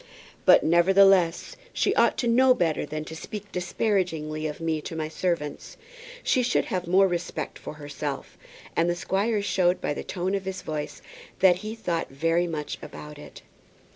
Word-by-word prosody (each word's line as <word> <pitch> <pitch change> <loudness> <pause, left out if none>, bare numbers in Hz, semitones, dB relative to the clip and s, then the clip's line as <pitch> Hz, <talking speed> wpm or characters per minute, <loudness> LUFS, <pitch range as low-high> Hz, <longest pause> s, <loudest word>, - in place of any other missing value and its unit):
"But, - - +8
nevertheless, 180 0 +4 0.2
she - - +1
ought - - +3
to 240 - 0
know 255 +2 +5
better 160 - 0
than 155 +1 -5
to 160 - -8
speak 205 +5 -8
disparagingly 175 -5 -1
of 150 - -6
me 160 -2 -1
to 165 - -7
my 155 -1 -2
servants. 160 -3 -3 0.5
She 255 - +2
should 245 0 +1
have 180 -2 -3
more 190 +2 +5
respect 175 -1 -4
for - - -8
herself." 145 -1 -6 0.4
And 170 +1 +2
the 175 - +1
squire 200 +4 0
showed 180 -2 +2
by - - -1
the - - -5
tone 185 +1 -3
of 195 -1 -2
his 190 -1 -5
voice 150 -1 -5 0.3
that 180 -2 +5
he 215 +4 -6
thought 175 -7 -2
very 165 +5 +1
much 155 -3 -4
about 150 0 -10
it. - - -12
175 Hz, 170 wpm, -26 LUFS, 155-195 Hz, 0.5 s, But